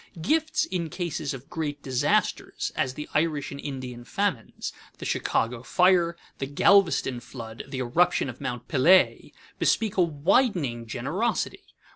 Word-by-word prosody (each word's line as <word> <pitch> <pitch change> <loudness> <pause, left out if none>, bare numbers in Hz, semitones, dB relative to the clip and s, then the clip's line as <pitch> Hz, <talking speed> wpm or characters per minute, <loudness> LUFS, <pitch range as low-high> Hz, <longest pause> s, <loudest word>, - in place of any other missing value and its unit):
Gifts 310 - +1
in 175 - -3
cases 160 -3 -3
of 135 -1 -8
great 145 -3 -4
disasters, 130 -2 0
as 130 0 -1
the 150 - -6
Irish 150 -2 0
and 140 - -7
Indian 130 -4 -6
famines, 185 - -2 0.2
the - - -7
Chicago 115 +1 0
fire, 175 +2 +3 0.2
the 135 - -2
Galveston 155 -4 +3
flood, 115 -2 -8
the 135 -1 -6
eruption 135 +7 +2
of 125 -2 -8
Mount 120 0 -4
Pelée, 170 +7 +4 0.3
bespeak 220 -2 +1
a - - +5
widening 160 - +1
generosity. 145 - -2
145 Hz, 135 wpm, -26 LUFS, 130-180 Hz, 0.3 s, a